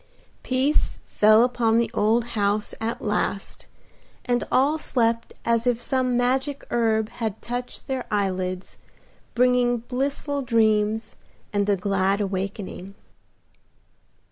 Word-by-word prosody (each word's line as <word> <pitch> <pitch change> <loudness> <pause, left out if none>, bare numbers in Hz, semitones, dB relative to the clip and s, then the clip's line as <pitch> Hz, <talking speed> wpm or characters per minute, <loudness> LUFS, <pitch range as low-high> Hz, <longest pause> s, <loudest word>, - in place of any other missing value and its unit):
Peace 265 +4 0
fell 215 +2 +5
upon 240 -2 +2
the 235 - +1
old 230 +3 +2
house 205 0 0
at 230 +1 -3
last, 210 -2 -2 0.6
and 245 0 +1
all 290 +5 +3
slept 230 -4 0
as 230 +1 +1
if 240 -2 +2
some 255 -1 0
magic 265 +3 0
herb 220 -2 +1
had 225 -3 -4
touched 245 +1 -5
their 265 -2 -3
eyelids, 185 -3 -2 0.6
bringing 245 0 +3
blissful 275 +4 -2
dreams 220 -2 +1 0.4
and 205 0 +1
a 200 - +4
glad 195 +1 0
awakening. 195 -1 -4
230 Hz, 115 wpm, -24 LUFS, 210-250 Hz, 0.6 s, fell